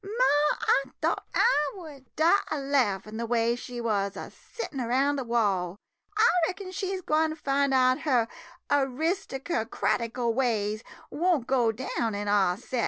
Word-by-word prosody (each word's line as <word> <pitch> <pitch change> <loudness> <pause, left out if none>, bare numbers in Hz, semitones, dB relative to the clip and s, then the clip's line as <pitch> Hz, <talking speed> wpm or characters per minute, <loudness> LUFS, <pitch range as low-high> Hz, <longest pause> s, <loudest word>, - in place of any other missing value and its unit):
Ma! 390 -9 +2
I 275 - +3 0.2
thought - - -1
I 300 - +3
would 300 -8 -12
die 335 +6 +4
a - - -1
laffin' 220 -7 0
de 235 - -2
way 235 0 +2
she 245 0 -7
wuz 200 -4 -1
a - - -7
sittin' 300 - -7
round 270 +4 +1
de - - -2
wall 200 -7 0 0.2
— 410 - -18
I 445 +2 +6 0.2
reckon 375 0 -6
she 380 0 -3
's - - -8
gwine 310 0 +1
fin' 280 -2 0
out 255 -1 +3
her 250 -7 +2 0.4
eristercrati 270 - -1
cal 235 -1 -1
ways 220 -4 0 0.3
won't 335 -5 +1
go 245 -4 +2
down 225 -2 -3
in 205 0 -4
our 195 -3 +2
set! 250 +4 -4
260 Hz, 165 wpm, -27 LUFS, 230-305 Hz, 0.4 s, I